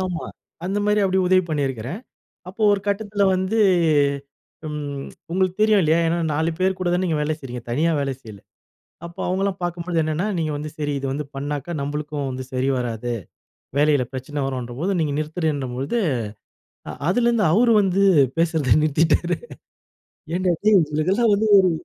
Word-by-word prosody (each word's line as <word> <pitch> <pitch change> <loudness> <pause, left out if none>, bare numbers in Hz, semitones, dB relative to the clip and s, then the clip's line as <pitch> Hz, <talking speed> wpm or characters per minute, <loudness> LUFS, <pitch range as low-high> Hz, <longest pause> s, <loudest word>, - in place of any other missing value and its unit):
ஆமா. 180 -3 -3 0.4
அந்த 195 +3 -1
மாதிரி 210 0 +2
அப்பிடி 190 -1 +2
உதவி 185 0 +5
பண்ணியிருக்கிறேன். 140 - -2 0.5
அப்போ 195 +4 -6
ஒரு 200 - +1
கட்டத்தில 205 0 -1
வந்து 190 +4 0 1.1
ம் 145 -2 -5 0.3
உங்களுக்கு 185 0 +1
தெரியும் 215 -2 +5
இல்லயா! 160 +1 +3
ஏன்னா 165 +1 +1
4 160 +3 0
பேர் 190 0 +1
கூட 185 -1 -1
தானே 180 +1 +1
நீங்க 165 -4 0
வேலை 150 +1 0
செய்றீங்க. 125 -3 -7
தனியா 155 +8 +1
வேலை 135 -1 -1
செய்யல. 110 -6 -12 0.7
அப்போ 170 - -11
அவுங்களலாம் 190 +1 0
பார்க்கும்போது 175 0 -3
என்னன்னா, 155 +6 -1
நீங்க 160 -2 -1
வந்து 150 +1 -5
சரி 145 -1 -2
இத 135 - -5
வந்து 145 +1 -3
பண்ணாக்கா 145 +3 -4
நம்மளுக்கும் 145 0 -3
வந்து 130 0 -5
சரி 130 +1 0
வராது, 120 0 -3 0.6
வேலையில 145 -3 +3
பிரச்சனை 135 +2 -4
வரும்ன்றப்போது, 130 +7 -3
நீங்க 150 -3 0
நிறுத்துறேன்றபொழுது, 150 - -2 0.9
அ - - -3 0.2
அதிலேருந்து 235 +1 +2
அவரு 230 +7 +4
வந்து 195 0 +2 0.4
பேசுறத 160 -5 +2
நிறுத்திட்டாரு. 165 +3 +2 1.0
ஏன்டா! 180 0 +1
டேய் 215 -2 +6
உங்களுக்கெல்லாம் 175 +9 +1
வந்து 215 +2 +1
ஒரு 185 -1 +4
160 Hz, 150 wpm, -22 LUFS, 145-185 Hz, 1.1 s, டேய்